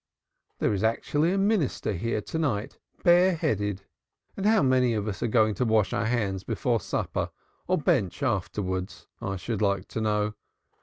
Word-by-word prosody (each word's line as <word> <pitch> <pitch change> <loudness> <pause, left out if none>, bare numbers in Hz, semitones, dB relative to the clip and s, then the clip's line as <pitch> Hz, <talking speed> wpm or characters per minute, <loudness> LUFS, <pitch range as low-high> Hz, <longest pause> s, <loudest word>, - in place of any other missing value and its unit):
There - - +1
is 100 +1 -1
actually 145 +8 +1
a 195 - +1
minister 195 - +1
here 110 +4 -1
to 160 - -4
night 120 -10 -2 0.2
bare 175 +1 +5
headed. 105 - -1 0.5
And 200 +1 -1
how 220 -4 +4
many 130 -3 +3
of 105 0 -2
us 100 - -4
are - - +1
going 110 -1 +3
to 100 - -1
wash 110 -3 +2
our 100 +2 0
hands 100 -6 -1
before 120 +2 0
supper - - -2 0.4
or 185 - +2
bensh 140 - 0
afterwards, 95 -5 -2 0.2
I 100 - -2
should 105 +3 -4
like 100 -2 +1
to 110 - -3
know. 105 -1 0
110 Hz, 170 wpm, -27 LUFS, 100-145 Hz, 0.5 s, bare